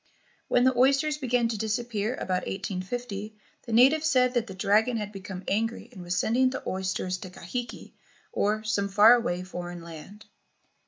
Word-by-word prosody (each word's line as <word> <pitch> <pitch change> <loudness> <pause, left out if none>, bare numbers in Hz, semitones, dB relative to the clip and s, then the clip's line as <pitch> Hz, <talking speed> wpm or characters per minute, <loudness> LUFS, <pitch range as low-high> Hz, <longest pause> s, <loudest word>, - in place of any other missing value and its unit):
When 245 - +3
the 260 0 +3
oysters 275 +4 +3
began 245 -3 +1
to 220 -3 -3
disappear 220 +1 -2
about 185 -5 -2
1850, 200 +3 -5 0.3
the - - -5
natives 275 +7 +5
said 250 -4 +3
that 240 -2 0
the 190 - -8
dragon 215 +5 +2
had 210 -1 -4
become 195 -2 -8
angry 225 +3 -1
and 185 - -11
was 175 +1 -3
sending 250 +7 +2
the 260 - -6
oysters 185 -1 -2
to 185 - -8
Kahiki, 235 +7 -7 0.4
or 215 +1 0
some 205 -2 -1
far 210 +4 +7
away 185 -7 0
foreign 175 -1 -7
land. 170 +6 -11
215 Hz, 165 wpm, -27 LUFS, 190-245 Hz, 0.4 s, far